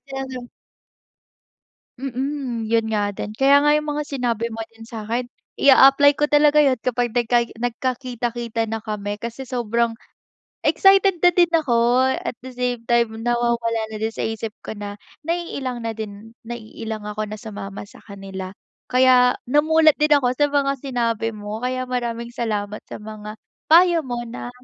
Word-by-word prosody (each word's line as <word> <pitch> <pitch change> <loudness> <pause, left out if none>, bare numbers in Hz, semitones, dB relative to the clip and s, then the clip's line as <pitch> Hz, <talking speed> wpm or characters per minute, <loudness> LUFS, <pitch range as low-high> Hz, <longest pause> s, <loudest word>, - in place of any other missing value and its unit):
talaga. 265 -2 -6 1.5
Mm, 265 -2 -3
yun 230 -1 +3
nga 205 -1 +1
din, 210 - -5
kaya 275 +3 +5
nga 295 0 +5
yung 300 0 -1
mga 295 0 -2
sinabi 240 -4 -1
mo 225 0 -4
din 225 0 -14
sa'kin, 230 +2 -3 0.3
i-aapply 275 +1 +7
ko 295 +1 0
talaga 295 0 +5
yun, 260 -4 +2
kapag 240 +1 -1
nagkai 240 0 +1
nagkakita-kita 240 -2 -2
na 225 - -2
kami. 205 -1 -5
Kasi 235 +4 -6
sobrang 235 -1 0 0.7
excited 390 -2 +4
na 355 - +8
din 345 -1 +4
ako 285 -7 0 0.4
at - - -4
the 260 - -8
same 245 -2 -2
time 235 -1 +3
nawawala 235 -1 0
na 215 - -6
din 225 0 -1
sa - - -3
isip 225 -1 -4
ko - - -5
na, 205 0 -6 0.3
naiilang 280 -8 -3
na 225 - -2
din, 215 +1 -8
naiilang 220 -2 -6
ako 215 +1 -3
na 215 0 -7
sumama 205 -3 -7
sa - - -16
kanila. 195 -2 -8 0.4
Kaya 250 -1 +5
namulat 310 +2 +4
din 300 0 +3
ako 250 -2 +1
sa 290 +1 +3
mga 280 -1 +2
sinabi 230 -4 -1
mo, 210 +1 -6
kaya 255 0 -1
maraming 235 -1 -3
salamat 210 -3 -3
sa - - -7
mga 215 0 -8 0.3
payo 340 0 +6
mo 240 -1 -3
na 245 +1 -7
240 Hz, 155 wpm, -22 LUFS, 225-270 Hz, 1.5 s, na